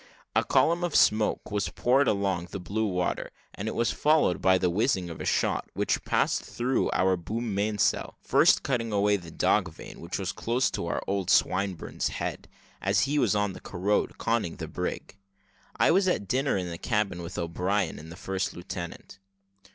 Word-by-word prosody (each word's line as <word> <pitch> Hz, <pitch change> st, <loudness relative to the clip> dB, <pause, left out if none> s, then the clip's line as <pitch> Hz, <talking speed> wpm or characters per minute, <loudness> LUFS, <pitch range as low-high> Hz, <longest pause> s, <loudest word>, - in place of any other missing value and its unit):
A -, -, +4 dB
column 170 Hz, +2 st, +2 dB
of 175 Hz, -3 st, -1 dB
smoke 105 Hz, 0 st, +3 dB
was 105 Hz, -1 st, -1 dB
poured 130 Hz, +2 st, +2 dB
along 95 Hz, -4 st, 0 dB
the 95 Hz, -, -5 dB
blue 105 Hz, +5 st, -1 dB
water, 90 Hz, -2 st, -1 dB, 0.2 s
and 105 Hz, -, -5 dB
it -, -, -3 dB
was 115 Hz, 0 st, +1 dB
followed 150 Hz, -, +2 dB
by 95 Hz, 0 st, +5 dB
the 90 Hz, -, +1 dB
whizzing 95 Hz, -3 st, 0 dB
of 80 Hz, -, -8 dB
a -, -, -4 dB
shot, -, -, 0 dB
which -, -, 0 dB
passed -, -, +1 dB
through 125 Hz, +2 st, -1 dB
our 95 Hz, 0 st, +2 dB
boom 110 Hz, +5 st, -4 dB
mainsail, 105 Hz, +1 st, 0 dB
first -, -, +4 dB
cutting 115 Hz, -4 st, -1 dB
away 105 Hz, 0 st, +3 dB
the 85 Hz, -4 st, -6 dB
dog 95 Hz, +2 st, +1 dB
vane, 80 Hz, -, -11 dB
which 85 Hz, +2 st, -4 dB
was 95 Hz, -2 st, -2 dB
close 120 Hz, +3 st, 0 dB
to -, -, -2 dB
old 95 Hz, -2 st, -2 dB
Swinburne's 95 Hz, -2 st, +1 dB
head, -, -, -4 dB, 0.3 s
as -, -, +2 dB
he 145 Hz, +2 st, +2 dB
stood 105 Hz, -, +2 dB
on 105 Hz, -2 st, 0 dB
the -, -, -11 dB
carronade, 100 Hz, +3 st, -1 dB
conning 115 Hz, -7 st, -1 dB
the 80 Hz, -3 st, -6 dB
brig. 90 Hz, +3 st, -5 dB, 0.6 s
I -, -, +4 dB
was 190 Hz, +2 st, +3 dB
at 140 Hz, -, 0 dB
dinner 135 Hz, +1 st, +1 dB
in 90 Hz, -2 st, -3 dB
the 85 Hz, -, -7 dB
cabin 105 Hz, -6 st, -1 dB
with 85 Hz, +2 st, -7 dB
O'Brien 90 Hz, +2 st, -1 dB
and 80 Hz, +2 st, -11 dB
the -, -, -8 dB
first 95 Hz, +1 st, -3 dB
lieutenant. 85 Hz, +1 st, -7 dB
100 Hz, 185 wpm, -27 LUFS, 90-115 Hz, 0.6 s, by